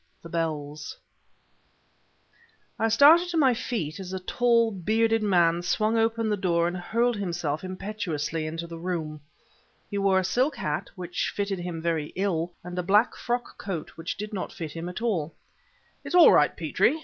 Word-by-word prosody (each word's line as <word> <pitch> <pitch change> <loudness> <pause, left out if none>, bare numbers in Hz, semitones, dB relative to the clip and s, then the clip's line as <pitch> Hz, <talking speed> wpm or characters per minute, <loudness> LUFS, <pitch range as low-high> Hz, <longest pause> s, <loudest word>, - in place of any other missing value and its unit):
THE 170 - -9
BELLS 155 -3 -3 1.8
I 225 - +2
started 295 +10 +6
to 340 - -1
my 270 -5 +5
feet 200 - -3
as 190 -1 -7
a 190 - -2
tall, 230 +4 +2
bearded 225 +4 +1
man 175 -4 +3
swung 215 +6 +1
open 225 0 +1
the 210 - +1
door 170 -3 +1
and 175 - -3
hurled 230 +6 0
himself 170 -5 -2
impetuously 180 -5 -3
into 165 +2 -4
the 165 -1 -8
room. 160 -4 -4 0.7
He 200 - -1
wore 195 -1 +3
a 190 - +2
silk 255 - +1
hat, 150 - -3
which 180 -1 -3
fitted 200 -2 -2
him 175 -2 -5
very 160 -3 -1
ill, 180 -3 -1
and 180 +1 -5
a - - +2
black 205 +6 +3
frock 240 0 -3
coat 180 -6 -4
which 165 +1 -6
did 210 +2 -6
not 190 - -4
fit 160 -3 -6
him 165 +2 -5
at 180 +5 -6
all. 170 -9 -1 0.7
"It's - - -3
all 355 - +9
right, - - +4
Petrie!" 315 - +1
185 Hz, 175 wpm, -26 LUFS, 165-225 Hz, 1.8 s, all